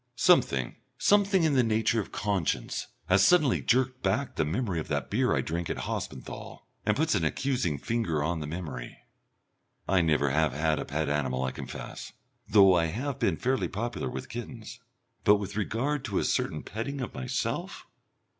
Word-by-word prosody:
Something - - +3 0.2
something 200 -3 +4
of 155 - +2
the 130 - +5
nature 115 0 +2
of 100 - -4
conscience 100 -6 -1 0.2
has 95 +1 +4
suddenly 155 - +4
jerked 130 +1 +1
back 140 0 0
the - - +1
memory 90 +3 -1
of 80 - -5
that 70 -3 -2
beer 125 +4 +2
I - - +1
drank 85 +1 -3
at - - -2
Hospenthal, - - -6 0.2
and 105 - +3
puts 160 +2 +2
an 95 -6 +1
accusing 90 - 0
finger 85 - -1
on 85 +2 -1
the 75 - -5
memory. 80 -7 -6 0.9
I 95 -1 +4
never 75 -4 +2
have 75 -1 +2
had 80 +1 +1
a - - -3
pet 75 +1 -2
animal, 65 -3 0
I 65 - -1
confess, - - -8 0.4
though 95 -3 +7
I 85 -2 +3
have 130 - -3
been 100 -10 +1
fairly 130 0 0
popular 115 +4 -3
with - - -6
kittens. 120 -1 -8 0.4
But 105 - +6
with 100 -1 -4
regard 125 +7 -1
to - - -2
a - - +2
certain 75 - -1
petting 135 +6 -4
of 125 - -5
myself 65 -1 -3
100 Hz, 175 wpm, -28 LUFS, 80-125 Hz, 0.9 s, though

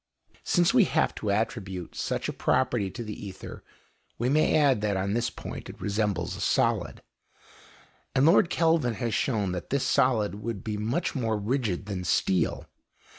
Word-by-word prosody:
Since 175 +3 +3
we 240 -6 +6
have 160 - +1
to 105 - -4
attribute 100 -4 -2
such - - -2
a - - -3
property 120 -6 +1
to 120 +5 -6
the 105 -1 -5
ether, 95 -2 -9 0.5
we 120 +2 0
may 150 +3 +3
add 140 -8 +3
that 105 -2 0
on 100 +1 -1
this 115 +1 0
point - - -8
it - - -10
resembles 105 0 -1
a - - -7
solid, - - 0 1.1
and 130 - +4
Lord 165 +1 +5
Kelvin 160 -8 +2
has 115 -2 -2
shown 105 -8 0
that 90 -1 -5
this 140 -1 0
solid, 110 -6 +2
would 110 -3 -4
be 110 -1 -3
much 115 +12 -1
more 115 -5 -1
rigid 105 -3 -1
than 95 -3 -4
steel. 90 +1 +1
110 Hz, 170 wpm, -27 LUFS, 100-130 Hz, 1.1 s, we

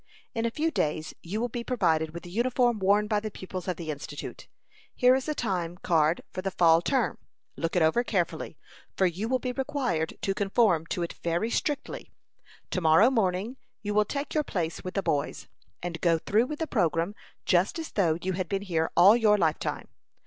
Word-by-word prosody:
In 230 0 0
a - - 0
few 315 +7 -1
days 155 - -1
you 195 +6 -4
will 240 - 0
be 240 0 -5
provided 165 -11 +1
with 170 +1 -8
the 175 - -10
uniform 240 +1 +1
worn 200 +2 +3
by 210 -1 +1
the 215 +1 -4
pupils 185 -2 -7
of 180 - -1
the 160 -3 -4
Institute. 145 0 -7 0.5
Here 250 0 +5
is 265 +3 0
a 305 - -1
time 180 -7 -2
card 165 -2 +2
for 185 - -3
the 195 - -1
fall 165 -3 +4
term. 260 +10 0 0.4
Look 165 +1 -3
it 175 - +4
over 160 +10 +3
carefully, 170 -7 -2 0.4
for 190 - +4
you 185 +6 -1
will 260 - +3
be 250 0 -3
required 255 - -2
to 195 - +1
conform 195 -4 +2
to 175 - -2
it 170 - -4
very 170 +7 0
strictly. 295 - -2 0.6
To 185 - -1
morrow 165 +10 +6
morning 215 +1 0 0.3
you 205 0 -2
will 210 0 +3
take 280 +7 -4
your 305 - +2
place 170 - -3
with 185 - -6
the 195 - 0
boys, 145 -1 -2 0.4
and 170 -2 -4
go 170 -2 +3
through 215 +8 +1
with 300 - -5
the 320 - -1
programme 170 - 0 0.3
just 180 - +2
as 325 -1 -5
though 170 -6 +2
you 190 +1 -1
had 180 -2 -3
been 195 0 -1
here 165 -4 0
all 190 +5 +8
your 215 -3 +4
lifetime. 160 -5 -1
190 Hz, 205 wpm, -28 LUFS, 170-235 Hz, 0.6 s, all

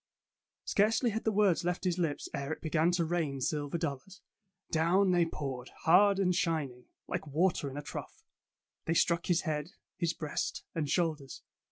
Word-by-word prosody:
'' - - -61
Scarcely 225 +3 +2
had 220 +2 -3
the 220 - +3
words 200 -5 +3
left 180 +1 -1
his 180 -1 0
lips 160 -4 -1
ere 140 +2 -3
it - - -3
began 160 +1 +2
to 170 -2 +1
rain 160 -5 -1
silver 145 +4 -1
dollars. 165 +3 -5 0.5
Down 180 +4 +3
they 175 -2 +3
poured, 135 -5 -5
hard 195 +4 +6
and 185 -2 +2
shining, 160 -9 -1 0.2
like - - -3
water 155 0 +1
in 135 - -8
a 145 - -5
trough. - - -8 0.6
They 165 - 0
struck 170 +1 +2
his 175 -2 +3
head, 155 +1 -3 0.2
his 170 -2 0
breast, 150 -3 -3
and 155 -3 -2
shoulders. 155 -5 -1
165 Hz, 175 wpm, -31 LUFS, 150-180 Hz, 0.6 s, hard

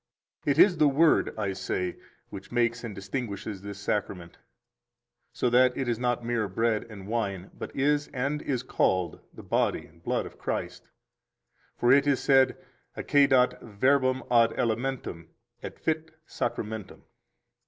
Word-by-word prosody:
10 145 - +3
It - - -10
is 180 +1 +6
the 150 - +5
Word 150 +3 +3
(I 100 -3 -1
say) 90 -1 -3 0.4
which 95 -1 -9
makes 120 -1 +1
and 110 -4 -6
distinguishes 100 -1 -5
this 100 0 -7
Sacrament, 95 -4 -3 0.9
so - - -1
that 125 +1 +4
it 135 - -2
is 120 -1 -1
not 120 -1 -1
mere 120 -3 0
bread 110 +3 0
and 100 -3 -10
wine, 100 -5 -3
but - - -8
is, 145 +1 +1
and 140 +3 -2
is 130 -5 -2
called, 90 -8 0
the - - -12
body - - 0
and 85 +2 -22
blood - - -1
of - - -12
Christ. - - -4 0.9
For 120 - +3
it 140 +1 +5
is 140 -2 +3
said: 135 -1 +4 0.4
Accedat 130 -3 +3
verbum 130 +4 +1
ad 115 -1 +5
elementum, 115 -7 -2 0.3
et - - -8
fit 160 0 -2 0.2
sacramentum. 110 -3 -4
120 Hz, 150 wpm, -27 LUFS, 100-135 Hz, 0.9 s, is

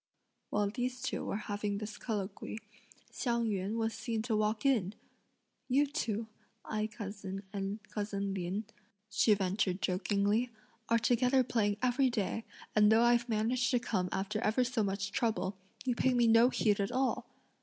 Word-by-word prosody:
While 205 -1 +1
these 250 +2 -2
two 260 - -2
were - - -2
having 205 0 -2
this 210 0 -6
colloquy, 205 -2 -4 0.5
Hsiang 235 -2 0
yün 200 0 -1
was 225 0 0
seen 225 -1 -3
to 225 -2 0
walk 215 +3 0
in! 220 -8 +2 0.7
"You 275 +3 +4
two, 230 -7 -2 0.4
Ai 215 0 -1
cousin 200 -3 -6
and 200 +1 -3
cousin 205 -2 -3
Lin," 190 +3 -2 0.5
she 210 0 +4
ventured 190 -1 0
jokingly, 205 +5 +1 0.4
"are 230 - +5
together 250 +3 +3
playing 205 -4 +1
every 255 +1 +3
day, 225 -1 -2 0.3
and 210 0 +6
though 225 +1 +6
I've 240 0 +3
managed 235 +3 +1
to 245 - +3
come 190 -7 -1
after 200 +3 -2
ever 235 +2 +2
so 250 -1 0
much 200 -1 -1
trouble, 200 -5 0 0.3
you 250 - +2
pay 255 +2 +2
no 235 0 +6
heed 210 -5 +2
to - - 0
me - - +2
at - - -6
all!" 260 0 0
215 Hz, 165 wpm, -33 LUFS, 200-240 Hz, 0.7 s, and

